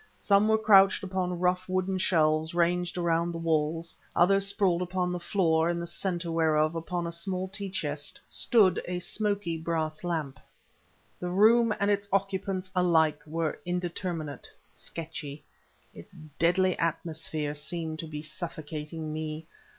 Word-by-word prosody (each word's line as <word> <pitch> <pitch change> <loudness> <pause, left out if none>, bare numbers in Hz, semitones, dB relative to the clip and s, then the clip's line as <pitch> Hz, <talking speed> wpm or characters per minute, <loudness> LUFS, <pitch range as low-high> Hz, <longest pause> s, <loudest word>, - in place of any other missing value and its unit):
Some 200 +1 +3
were 220 0 +4
couched 200 -2 +5
upon 185 -2 -2
rough 180 +1 +1
wooden 185 0 0
shelves 160 -2 +2
ranged 175 +1 +1
around 170 0 +1
the 165 - -5
walls, 165 0 -1 0.2
others 195 +2 +4
sprawled 190 -3 +1
upon 180 0 -1
the 180 - -2
floor, 170 -3 +2
in 170 0 -1
the 170 - -3
center 175 -1 -2
whereof, 155 -1 +2
upon 170 +1 -3
a 170 - -3
small 185 +2 -2
tea 195 +1 -5
chest, 150 -5 -4
stood 205 -7 +3
a 180 0 -2
smoky 200 -2 -1
brass 160 -1 -2
lamp. 155 -7 -3 0.8
The 180 - -3
room 220 +5 +5
and 200 0 +2
its 200 0 0
occupants 195 -1 -1
alike 160 -4 +3
were 160 0 -2
indeterminate, 175 -4 -4 0.2
sketchy; 155 -3 -6 0.5
its 85 - -13 0.2
deadly 180 +2 +3
atmosphere 160 -2 -2
seemed 160 +1 -4
to 165 - -5
be 150 -1 -6
suffocating 155 0 -5
me. 155 0 -4
170 Hz, 145 wpm, -28 LUFS, 160-185 Hz, 0.8 s, couched